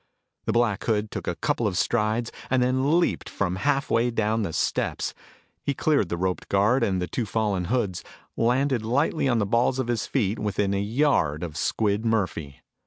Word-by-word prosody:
The - - +1
Black 115 -4 +1
Hood 105 -2 0
took - - -5
a - - -1
couple 115 - 0
of 90 -3 -2
strides 115 +2 0 0.2
and 130 -1 +3
then 130 +6 +2
leaped 175 - -1
from 95 -2 -2
halfway 125 0 +1
down 110 -1 0
the 100 - -2
steps. - - -1 0.5
He 140 - -2
cleared 140 - +2
the 85 - -2
roped 90 +1 -2
guard 105 +6 +3
and 95 -4 +1
the 90 - -1
two 115 +4 -3
fallen 100 -4 0
hoods, 105 -5 -1 0.3
landed 125 +1 +1
lightly 140 +5 +1
on 120 -3 +2
the 105 - +1
balls 120 +5 +2
of 130 -2 -2
his 120 -3 -1
feet 110 -5 0
within 100 -1 0
a 100 - 0
yard 100 - +1
of 80 -4 -5
Squid 105 +4 0
Murphy. 90 - -1
110 Hz, 185 wpm, -25 LUFS, 100-125 Hz, 0.5 s, and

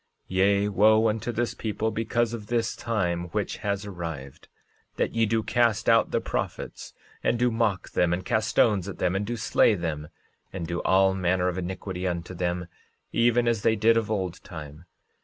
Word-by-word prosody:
13:24 - - -4
Yea, 100 +1 +3
wo 110 +2 +5
unto 110 +2 -2
this 120 +1 -1
people, 110 0 -2
because 115 +1 0
of 110 -3 -6
this 115 -1 0
time 90 -7 -1
which 100 +3 -3
has 100 0 -2
arrived, 80 -8 -7 0.5
that - - -1
ye 115 -1 +2
do 110 +1 +1
cast 115 -2 +1
out 115 0 +5
the - - +1
prophets, - - -5 0.3
and 120 - +2
do 125 0 +2
mock 110 -5 0
them, 85 -1 +2
and 90 +1 -2
cast 110 +3 +1
stones 100 -4 +2
at 95 - -7
them, 90 - 0
and 100 +1 -1
do 120 +1 -3
slay 110 - +3
them, 80 -4 -4 0.4
and 90 -3 -4
do 85 +1 -3
all 95 0 +4
manner 90 -1 +1
of 90 - -4
iniquity 95 0 -4
unto 85 0 -3
them, 90 0 -2 0.5
even 120 0 +3
as 115 -3 +1
they 110 - +3
did 110 +2 +4
of 115 -2 0
old 95 -5 -3
time. 80 -2 -9
100 Hz, 190 wpm, -26 LUFS, 90-115 Hz, 0.5 s, wo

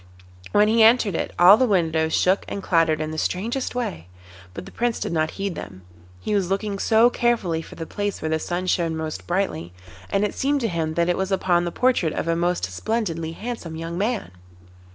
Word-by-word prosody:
When 210 +1 +4
he 225 +1 +3
entered 225 -2 +5
it - - -2
all 185 +4 +8
the 255 +1 +2
windows 160 -5 +1
shook 185 +2 +2
and 200 - -5
clattered 165 -3 +2
in 155 0 -3
the 155 - -4
strangest 230 - -2
way, 90 - -4 0.4
but 90 - -8
the - - -11
Prince 240 -1 -1
did - - -3
not 155 -1 +1
heed 195 -1 -2
them; 95 - -9 0.4
he 210 - -3
was 195 -3 +1
looking 200 +1 -2
so 230 +3 +4
carefully 210 -11 0
for - - -12
the 165 - -6
place 205 +3 -3
where 155 - -3
the 160 0 0
sun 175 +3 -3
shone 170 -3 0
most 160 -1 -5
brightly, 175 - -2 0.4
and 200 +1 +1
it 205 - -3
seemed 280 +1 0
to 230 - +1
him 165 -4 -2
that 170 +1 +2
it 175 - +1
was 190 +1 -2
upon 175 -2 +2
the 175 - -3
portrait 240 -8 +1
of - - -3
a 165 - +1
most 175 +1 0
splendidly 165 - -3
handsome 210 -5 -6
young 165 +1 -5
man. 210 - -2
180 Hz, 215 wpm, -23 LUFS, 160-215 Hz, 0.4 s, all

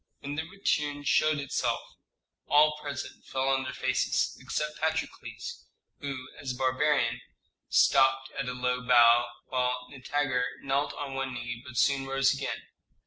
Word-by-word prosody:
When 140 +1 -5
the 160 +2 -4
retinue 150 -7 -1
showed 155 +1 +3
itself, 140 -2 -1 0.6
all 150 +1 +5
present 145 -2 -6
fell 135 0 -1
on 135 0 +2
their - - -3
faces, - - 0
except 150 0 -3
Patrokles, 160 - -3 0.3
who, 135 -4 -5
as 135 -3 -3
a - - -9
barbarian, 135 +3 +1 0.5
stopped 130 0 +4
at 135 -2 -3
a - - -3
low 125 0 -1
bow, 120 -1 +6 0.2
while 125 -1 0
Nitager 135 -1 -1 0.2
knelt 140 +2 0
on 140 -2 -5
one 135 -1 -3
knee, 120 -1 -5
but 130 -2 -9
soon 135 -1 +2
rose 135 0 +3
again. 140 0 -4
135 Hz, 145 wpm, -29 LUFS, 125-145 Hz, 0.6 s, bow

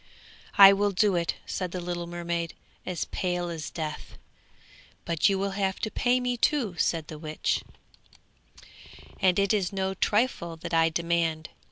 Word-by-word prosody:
'I 195 0 +11
will 205 +1 +2
do 200 0 +2
it,' 170 -1 0
said 185 -1 -3
the 185 - -4
little 175 -1 -4
mermaid 170 -1 -3 0.3
as 180 -3 -2
pale 180 -1 -2
as 160 -3 -5
death. 155 -2 -6 0.9
'But 170 +3 +2
you 195 - +1
will 195 +1 -1
have 195 -1 -1
to 215 - -2
pay 250 +1 +2
me, 250 -1 -1
too,' 235 -7 +1
said 165 -2 0
the 155 - -8
witch, 155 -1 -2 1.6
'and 185 -2 +3
it 200 0 +2
is 195 -4 0
no 190 -1 -1
trifle 205 -4 0
that 165 - -7
I 165 0 +4
demand. 165 -1 -1
180 Hz, 160 wpm, -27 LUFS, 170-200 Hz, 1.6 s, I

